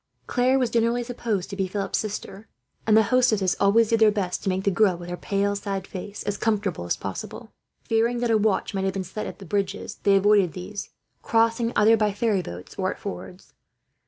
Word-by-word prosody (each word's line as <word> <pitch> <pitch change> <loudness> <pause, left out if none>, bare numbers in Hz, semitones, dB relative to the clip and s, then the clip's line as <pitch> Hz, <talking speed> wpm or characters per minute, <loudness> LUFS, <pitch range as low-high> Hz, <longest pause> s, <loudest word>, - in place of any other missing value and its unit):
Claire 255 +2 +2
was 250 -3 0
generally 235 +1 +1
supposed 230 -6 -3
to 200 - -7
be 195 -1 -1
Philip's 195 +1 -2
sister; 210 0 -6 0.4
and 215 0 +6
the 220 - +6
hostesses 215 -6 +2
always 215 +3 +4
did 230 - +2
their 220 -1 +6
best 195 -4 -2
to - - -1
make 190 +1 -1
the 200 - +2
girl, 185 -1 +3
with 175 0 -9
her 175 - -3
pale 200 +2 -1
sad 195 -2 -4
face, 200 +2 -7
as 205 0 -2
comfortable 205 - -1
as 85 - -1
possible. - - -7 0.3
Fearing 230 +2 +1
that 240 -1 +1
a 220 - +5
watch 210 -1 0
might 195 -1 -1
have 190 - 0
been 195 0 -3
set 190 +4 -5
at - - -8
the 195 - -11
bridges, 200 +2 -3
they 200 -1 +4
avoided 195 -3 +4
these, 195 +3 -6 0.3
crossing 230 +1 +2
either 215 +2 +6
by 210 -1 +2
ferry 205 -2 +1
boats 90 - -9
or 185 0 +1
at - - -5
fords. 195 -2 -8
205 Hz, 215 wpm, -25 LUFS, 190-225 Hz, 0.4 s, and